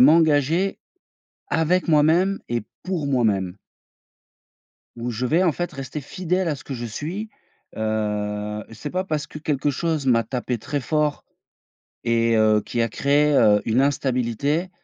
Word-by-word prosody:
m'engager 160 +5 +4 0.7
avec 175 +3 +1
moi-même 165 +6 +3
et 120 -2 0 0.2
pour 175 -6 -2
moi-même. 105 -8 +1 1.4
Où 120 +1 -3
je 120 +3 -2
vais, 165 +8 +3
en 170 -4 +3
fait, 175 +3 -3
rester 135 +2 -6
fidèle 180 +5 -1
à 150 - 0
ce - - -13
que 140 - -6
je 120 -1 -4
suis, 170 - -5 0.5
heu, 105 -1 -2
c'est 115 +7 -6
pas 185 +1 -1
parce 155 -4 -2
que - - -9
quelque 150 -2 -1
chose 155 0 -1
m'a 115 -3 +4
tapé 125 +1 -2
très 145 +5 -3
fort 150 +1 0 0.8
et 115 0 +2
heu, 110 -1 +4
qui 120 - -1
a 115 - +2
créé, 145 +5 +2
heu, 105 -5 +5
une 115 +4 +2
instabilité 140 +4 0
140 Hz, 150 wpm, -23 LUFS, 115-160 Hz, 1.4 s, heu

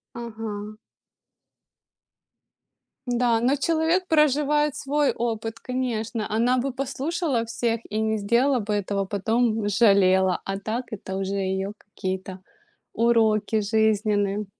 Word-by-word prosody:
Ага. 215 -3 -6 2.3
Да, 240 -2 +2
но 255 +4 +2
человек 330 +4 +1
проживает 300 -2 +2
свой 290 0 +1
опыт, 225 -1 -3
конечно. 235 -3 -3
Она 235 +4 +2
бы 265 +2 -1
послушала 275 0 -2
всех, 230 0 -1
и 215 - -3
не 220 0 0
сделала 240 +6 +2
бы 210 0 -2
этого, 200 -1 -1
потом 220 +4 0
бы 220 - -2
пожалела. 190 -3 +3
А 195 0 -3
так 225 +5 -3
это 190 -3 -6
уже 195 0 -2
её 190 +1 -2
какие-то 190 -2 -6 0.5
уроки 220 -2 +2
жизненные. 210 -1 +1
225 Hz, 115 wpm, -24 LUFS, 205-255 Hz, 2.3 s, пожалела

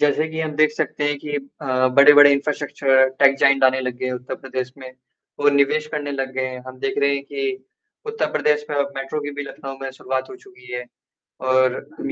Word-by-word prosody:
जैसे 150 +2 +2
कि 160 0 -5
हम 155 -1 -3
देख 155 0 +4
सकते 150 - -3
हैं 145 -1 0
कि 145 0 -7 0.3
अ, 130 -2 +1
बड़े-बड़े 145 +2 +8
इंफ्रास्ट्रक्चरर 140 -2 +2
टेक 135 0 +6
जायंट 140 -1 +4
आने 130 0 +4
लग 125 -1 -4
गए - - -2
हैं 130 - -2
उत्तर 125 +1 -5
प्रदेश 130 -1 -5
में 130 -1 -10 0.5
और 145 0 +5
निवेश 140 +2 +2
करने 145 -2 -3
लग 135 -1 -3
गए 130 0 -1
हैं। 130 -1 -7
हम 130 0 -10
देख 135 - -2
रहे 140 0 +2
हैं 140 - -3
कि 400 - -4 0.4
उत्तर 445 +2 -2
प्रदेश 150 0 +1
में 145 - -2
अब 140 0 -1
मेट्रो 135 +3 -4
की 145 0 -5
भी - - -1
लखनऊ 135 -1 -8
में 135 - -4
शुरुआत 130 0 -4
हो 390 - -9
चुकी 380 - -16
है 125 0 -4 0.7
और 130 -1 +3 0.2
हम 285 -3 -4
140 Hz, 225 wpm, -21 LUFS, 130-150 Hz, 0.7 s, बड़े-बड़े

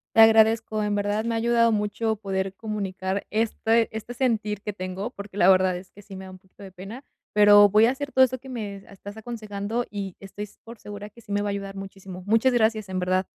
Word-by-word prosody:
Te 225 - +8
agradezco, 220 -1 +5
en 205 0 0
verdad 205 +2 -1
me 230 0 -1
ha - - 0
ayudado 230 0 +3
mucho 215 +1 -1
poder 195 -2 -3
comunicar 195 -3 -4
este 225 +1 +1
este 220 +2 -6
sentir 220 -5 -1
que 210 - -5
tengo 185 +4 -5
porque 200 -2 -10
la 185 - +5
verdad 185 -1 +4
es 185 +1 -12
que 205 - -15
sí 195 -1 -12
me 190 0 -8
da 185 - -10
un 185 - -13
poquito 190 +1 -18
de 190 - -10
pena, 200 +8 -9 0.3
pero 205 -1 +7
voy 215 +3 +5
a 240 - +3
hacer 280 +2 -5
todo 260 - +5
esto 255 0 -5
que 265 +2 -13
me 210 -5 -5
estás 200 +1 -11
aconsejando 220 0 -4
y 195 -3 -5
estoy 205 +1 -7
s 205 - -21
por 230 -1 -12
segura 205 0 -8
que 235 +3 -17
sí 205 - -12
me 205 - +1
va 205 - -2
a - - -1
ayudar 200 0 -5
muchísimo, 195 -1 -9
muchas 225 +5 +3
gracias, 220 -3 +1
en 185 -1 -2
verdad. 185 +1 0
205 Hz, 235 wpm, -25 LUFS, 195-225 Hz, 0.3 s, Te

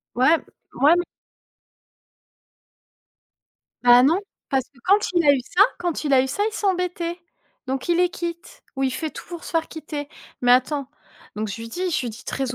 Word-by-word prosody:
Ouais, 265 +7 +5 0.4
mouais 295 +4 +5
m 350 - +3 2.8
Bah 245 0 +7
non, 335 +7 +3 0.3
parce 265 -2 +1
que 265 - -26
quand 395 +2 +6 0.2
il 340 -3 +3
a 285 - +8
eu 270 - +1
ça, 365 +10 +4 0.2
quand 345 -3 -2
il 285 - 0
a 260 - +6
eu 265 - -2
ça, 405 - -1
il 440 - -2
s'embêtait. 360 -3 -1 0.5
Donc, 265 +3 -3
il 345 - +3
les 360 0 +3
quitte 340 0 -7
ou 270 - -1
il 260 - +1
fait 315 +1 -3
tout - - -10
pour 345 -1 -7
se - - -7
faire 330 -1 0
quitter. 300 -2 -6 0.3
Mais 245 0 +4
attends, 265 +2 +2 0.5
donc, 215 0 -3
je 215 +3 -6
lui 230 - -7
dis 360 +7 -3
je - - 0
lui 240 - -3
dis 225 +4 -12
très 260 -2 -3
300 Hz, 195 wpm, -23 LUFS, 260-345 Hz, 2.8 s, a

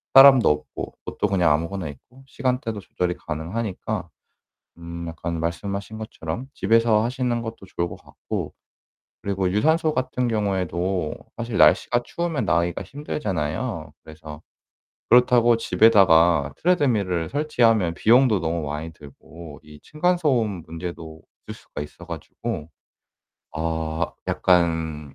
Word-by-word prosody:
사람도 135 - +9
없고 75 - -3
옷도 105 - -1
그냥 90 -5 +2
아무거나 85 +2 -2
입고 125 - -15
시간대도 125 -5 -2
조절이 90 -2 -3
가능하니까 90 +7 -4 0.7
음 85 0 -7
약간 85 0 -4
말씀하신 100 +6 -4
것처럼 110 +1 -6
집에서 110 +1 +3
하시는 120 -1 -1
것도 115 -3 -7
좋을 85 0 0
것 - - -8
같고 - - -6 0.7
그리고 95 -2 -1
유산소 160 +8 +2
같은 125 -1 -1
경우에도 95 -5 -1 0.2
사실 115 -1 -3
날씨가 120 0 +4
추우면 170 -4 -2
나가기가 85 0 0
힘들잖아요. 95 - -4
그래서 80 -1 -10 0.7
그렇다고 120 -1 +5
집에다가 90 -8 +4
트레드밀을 110 - +1
설치하면 115 - +2
비용도 115 +1 +4
너무 85 0 -2
많이 75 +3 -5
들고 75 +1 -13
이 75 -1 -14
층간소음 150 - 0
문제도 80 -1 -7 0.3
있을 - - -5
수가 - - -9
있어 75 - -11
가지고 75 - -6 0.8
아 80 0 -2
약간 80 -5 +1
95 Hz, 305 characters per minute, -23 LUFS, 80-120 Hz, 0.8 s, 사람도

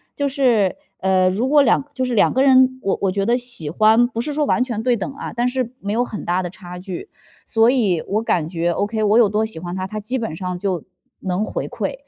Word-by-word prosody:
就 285 - -1
是 245 -8 +2 0.2
呃， 185 -1 +2
如 215 +8 -1
果 295 -1 +5
两 265 +2 +3
就 260 - -1
是 250 - -2
两 205 - +4
个 260 - +2
人， 260 -1 +4
我 195 - 0
我 195 -2 +1
觉 195 +1 -1
得 235 +3 +2
喜 240 -11 +2
欢 220 +5 +4
不 230 -2 -4
是 295 +3 -2
说 300 0 0
完 250 - +1
全 230 -4 -4
对 250 -1 +2
等 215 +5 -4
啊， 280 - -7
但 240 +1 0
是 250 -1 -3
没 200 +1 -3
有 240 +2 +1
很 215 - -7
大 180 +2 0
的 175 - -4
差 180 -2 -10
距， 185 - -7 0.4
所 225 +1 +4
以 200 -11 +1
我 215 +2 0
感 170 -8 0
觉 170 0 -1
，ok， 210 +5 -2
我 210 +1 +3
有 230 -4 +5
多 210 +2 0
喜 220 -5 -8
欢 175 +1 -6
他， 185 0 -3
他 215 +2 -5
基 230 +5 -3
本 220 -9 -4
上 180 0 -5
就 185 -5 -2 0.4
能 185 +2 -1
回 - - -4
馈。 - - -4
215 Hz, 275 characters per minute, -20 LUFS, 185-250 Hz, 0.4 s, 果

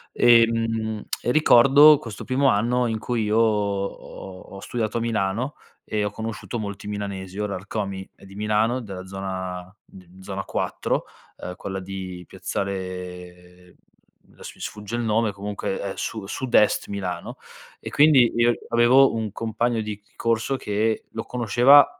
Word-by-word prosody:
Ehm, 115 -2 +3 0.2
e 120 - +1
ricordo 145 +1 +7
questo 115 -7 -8
primo 135 +2 +1
anno 125 +2 +2
in 110 -2 -1
cui 115 0 -1
io 105 +1 +1
ho 100 -3 -1
ho 95 - -8
studiato 110 0 -2
a - - -3
Milano, 115 +4 -1 0.3
e 105 -1 -2
ho 105 - -2
conosciuto 110 0 -5
molti 100 -1 -6
milanesi. 100 -2 -5
Ora 105 -1 -2
Rkomi 95 0 -5
è - - -21
di 95 0 -13
Milano 105 +4 +1
della 95 -4 -8
zona, 95 -1 -5
d 90 0 -16
zona 95 0 -5
4, - - -2 0.3
uhm, 90 - -7
quella 95 +1 -5
di 95 -1 -7
piazzale 90 -2 -6 0.5
mhmm, - - -25
adesso - - -10
mi - - -16
sfugge 105 +2 -5
il - - -1
nome 110 -1 +1
comunque 100 0 -4
è 100 -1 -3
su 110 -3 -4
sud-est 120 -2 +2
Milano, 90 -4 -4 0.4
e - - -6
quindi 140 -5 +5
io 120 0 +4 0.2
avevo 120 +3 +5
un 110 -3 -2
compagno 115 +1 -1
di 105 -1 -5 0.2
corso 115 +3 0
che 110 0 -1
lo 110 - -4
conosceva, 125 +4 +6
105 Hz, 150 wpm, -24 LUFS, 95-115 Hz, 0.5 s, ricordo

